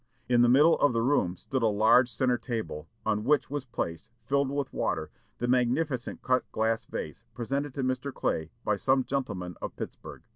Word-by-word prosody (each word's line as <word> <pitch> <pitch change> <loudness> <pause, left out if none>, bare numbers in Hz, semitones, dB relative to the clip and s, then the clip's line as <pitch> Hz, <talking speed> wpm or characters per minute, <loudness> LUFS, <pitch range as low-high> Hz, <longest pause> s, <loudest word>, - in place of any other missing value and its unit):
In 120 -1 +4
the 120 - +5
middle 150 +6 +6
of 145 - +4
the 115 - +1
room 115 -9 +2
stood 130 +7 -3
a 115 - +4
large 110 +4 +5
centre 125 -1 +1
table, 115 - -4 0.2
on 105 -1 +1
which 145 +2 +2
was 145 -2 -3
placed, 105 -5 -4 0.2
filled 140 +2 +1
with 140 -1 -3
water, - - -1 0.3
the 120 - -2
magnificent 125 +1 0
cut 130 0 +1
glass 110 0 0
vase - - -6
presented 135 +3 -2
to 135 - -2
Mr. 130 +2 -1
Clay 80 - -2
by 105 - +1
some 130 +4 +2
gentlemen 95 -11 -3
of - - -5
Pittsburg. - - -8
125 Hz, 185 wpm, -28 LUFS, 110-135 Hz, 0.3 s, middle